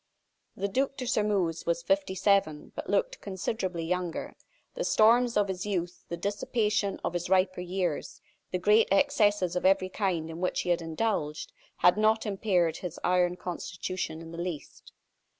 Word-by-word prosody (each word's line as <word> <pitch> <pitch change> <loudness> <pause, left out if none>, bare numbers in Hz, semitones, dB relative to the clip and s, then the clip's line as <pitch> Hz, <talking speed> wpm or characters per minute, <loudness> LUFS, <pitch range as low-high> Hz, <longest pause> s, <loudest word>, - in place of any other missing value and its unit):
The 200 - -1
Duc 270 +6 -1
de 255 - -4
Sairmeuse 205 -9 0
was 170 0 0
fifty 190 +1 +1
seven, 190 -6 +1
but - - -6
looked - - 0
considerably 190 -3 -3
younger. 180 0 -2 0.4
The - - -3
storms 235 - +4
of 205 -1 +3
his 190 +1 -4
youth, 180 -3 -3
the 170 - -3
dissipation 205 +1 -1
of - - -1
his 175 0 -3
riper 185 -1 +2
years, 180 -3 -3 0.3
the 180 - -1
great 210 +5 +4
excesses 205 -5 +3
of 180 - -1
every 185 0 +3
kind 180 -5 -1
in 165 +2 -7
which 180 - 0
he - - -4
had 175 0 +2
indulged, 160 -2 -2 0.2
had 180 +3 +4
not 220 +1 +3
impaired 190 -5 +1
his 175 -2 -6
iron 180 0 +2
constitution 180 -2 -5
in 165 - -10
the 170 - -7
least. 175 -5 -7
185 Hz, 165 wpm, -29 LUFS, 175-210 Hz, 0.4 s, storms